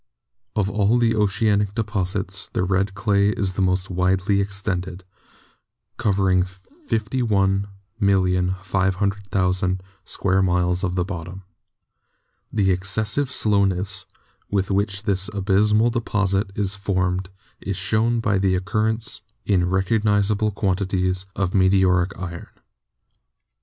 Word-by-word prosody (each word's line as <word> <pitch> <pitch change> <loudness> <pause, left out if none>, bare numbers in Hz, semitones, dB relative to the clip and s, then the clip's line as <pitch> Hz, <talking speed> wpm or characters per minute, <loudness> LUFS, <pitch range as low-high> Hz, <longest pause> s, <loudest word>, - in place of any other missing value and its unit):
Of 105 -3 +1
all 105 +3 +2
the 115 -1 +3
oceanic 105 -1 +1
deposits 95 -3 -2
the - - 0
red 95 +1 0
clay 100 -1 +2
is 100 -3 -1
the 95 - -2
most 90 0 0
widely 95 +2 +1
extended, 95 -2 -3 0.9
covering 95 -5 +2 0.5
51,500,000 95 -3 0 0.2
square 95 0 +1
miles 90 0 +1
of 90 -2 -1
the 90 -1 0
bottom. 90 0 -7 1.1
The 100 -3 +2
ex 95 +1 -1
cessive 110 +7 +1
slowness 100 -5 +1 0.4
with 100 -1 0
which 100 0 0
this 100 -2 0
abyssmal 105 +3 +2
deposit 105 -4 0
is 100 -1 +1
formed 95 -2 -1 0.3
is 95 -2 -4
shown 110 +5 +1
by 105 -3 +1
the 95 -1 +2
occurrence 110 +4 -1 0.2
in 90 -3 +2
recognisable 105 +2 +1
quan 95 -2 0
tities 95 -1 -1
of 95 -2 -1
meteoric 95 -1 +3
iron. 85 -2 -6
95 Hz, 110 wpm, -22 LUFS, 95-105 Hz, 1.1 s, the